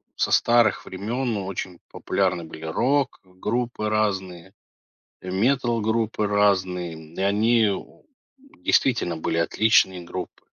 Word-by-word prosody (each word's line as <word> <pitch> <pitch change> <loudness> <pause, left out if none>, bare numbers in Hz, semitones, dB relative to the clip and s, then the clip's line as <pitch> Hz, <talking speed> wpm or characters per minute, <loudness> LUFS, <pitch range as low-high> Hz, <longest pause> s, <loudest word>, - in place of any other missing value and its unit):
со - - 0
старых 120 -3 +3
времен 115 +4 -3
очень 95 -2 -5
популярны 90 -3 -1
были 80 0 -10
рок-группы 120 - -1
разные, 95 -4 -2 0.7
э, 90 - -7
метал-группы 115 -1 +1
разные, 95 -4 +1 0.2
и - - -4
они, 110 +2 +3
о, 95 - -8 0.6
действительно 100 -10 +2
были 80 - -2
отличные 95 0 +3
группы. 90 +1 -7
100 Hz, 100 wpm, -24 LUFS, 90-115 Hz, 0.7 s, старых